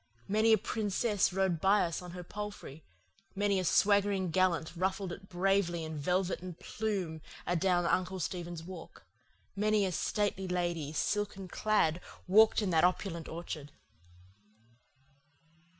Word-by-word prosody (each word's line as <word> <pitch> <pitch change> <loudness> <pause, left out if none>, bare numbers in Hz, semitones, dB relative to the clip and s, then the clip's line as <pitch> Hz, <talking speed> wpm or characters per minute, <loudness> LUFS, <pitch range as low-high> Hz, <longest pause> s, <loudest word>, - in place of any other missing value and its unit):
Many 215 +2 +3
a 220 - +7
princess 210 -1 0
rode 185 -3 0
by 200 +2 +4
us 170 0 -2
on 180 - -9
her 180 -1 -7
palfrey, 200 -6 -7 0.5
many 200 -1 +1
a - - -1
swaggering 200 0 +3
gallant 175 -2 +1
ruffled 190 +1 -1
it 195 +3 -9
bravely 180 -2 +1
in 160 0 -5
velvet 180 +5 0
and 180 -2 -8
plume 190 -8 -3 0.2
adown 175 0 +2
Uncle 185 +2 0
Stephen's 175 -1 -4
Walk, 175 -1 -10 0.5
many 210 0 +2
a 185 - -1
stately 195 +2 -1
lady, 175 -4 -1
silken 200 +3 -2
clad, 180 -4 +1 0.3
walked 215 +3 +5
in 190 - 0
that 160 -1 +3
opulent 180 -2 0
orchard! 155 -3 -6
185 Hz, 135 wpm, -32 LUFS, 170-200 Hz, 0.5 s, a